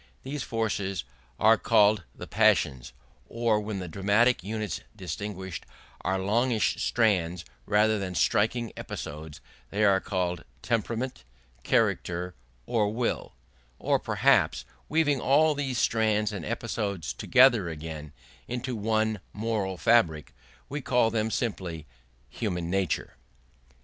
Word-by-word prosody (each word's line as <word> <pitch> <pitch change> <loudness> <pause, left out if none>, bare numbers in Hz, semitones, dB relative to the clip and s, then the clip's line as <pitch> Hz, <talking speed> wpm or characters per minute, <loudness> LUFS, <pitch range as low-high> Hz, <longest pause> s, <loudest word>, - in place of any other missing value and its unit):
These 140 +2 -4
forces 100 -5 -2 0.4
are 110 0 +5
called 105 -4 +4
the - - -8
passions; 65 -4 +2 0.4
or 115 -2 +1
when 105 -1 -4
the 90 -1 -5
dramatic 100 +7 +2
units 110 +1 -3
distinguished 95 0 -5 0.4
are 95 - 0
longish 110 +4 +1
strands 90 -7 +1 0.2
rather 105 +1 +3
than 95 -2 -4
striking 115 +6 +1
episodes, 75 0 -7 0.3
they 105 - 0
are 100 -2 +5
called 90 -3 -2 0.2
temperament, 115 - -2 0.4
character, 90 +7 0 0.3
or 105 -3 +1
will; 115 - -2 0.4
or - - +1
perhaps, - - +2 0.2
weaving 145 -4 +2
all 150 +3 +4
these 135 -3 -2
strands 110 -2 +2
and 95 -5 -5
episodes 100 -6 -3
together 125 -8 +4
again 80 -1 -7 0.4
into 125 +1 -3
one 110 0 0
moral 105 -4 -2
fabric, 85 - +2 0.3
we 145 +2 -4
call 125 -3 +2
them 110 0 0
simply 95 - -3 0.4
human 90 - -3
nature. 95 -3 -1
105 Hz, 115 wpm, -27 LUFS, 90-115 Hz, 0.4 s, are